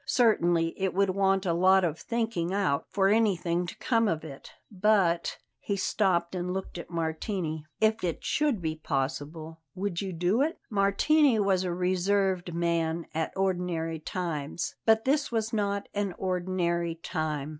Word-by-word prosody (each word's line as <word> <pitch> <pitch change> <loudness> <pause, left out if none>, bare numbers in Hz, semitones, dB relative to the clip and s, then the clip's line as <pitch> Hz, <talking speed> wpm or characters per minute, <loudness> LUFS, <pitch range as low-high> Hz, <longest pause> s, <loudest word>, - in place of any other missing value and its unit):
"Certainly 175 -9 +3
it 190 -2 0
would 195 0 +3
want 195 0 +2
a 170 - +1
lot 185 +2 +5
of 160 -2 -1
thinking 225 -7 -2
out 190 -8 0
for 195 -1 +2
anything 180 -5 +1
to - - -8
come 230 -2 +2
of 160 -5 -1
it. 140 -3 -10 0.2
But" 195 -4 +2 0.2
he 200 - -2
stopped 185 -3 +1
and 180 0 -2
looked 190 -1 -5
at - - -9
Martini 160 -1 -3
"if 220 -1 +2
it 170 -3 -2
should 280 - +1
be 160 -1 -1
possible 155 +3 -3
would 190 -2 -2
you 195 -1 -3
do 180 +7 +1
it?" 315 +4 0
Martini 225 +7 +3
was 195 -2 +2
a 180 - -1
reserved 185 0 +1
man 170 -1 0
at 160 0 -1
ordinary 175 -4 -1
times; 155 -2 -3
but 220 0 +4
this 280 +1 +1
was 225 -1 -1
not 200 -1 -1
an 200 -3 -2
ordinary 175 -2 -1
time. 155 -3 -3
185 Hz, 155 wpm, -28 LUFS, 165-200 Hz, 0.2 s, lot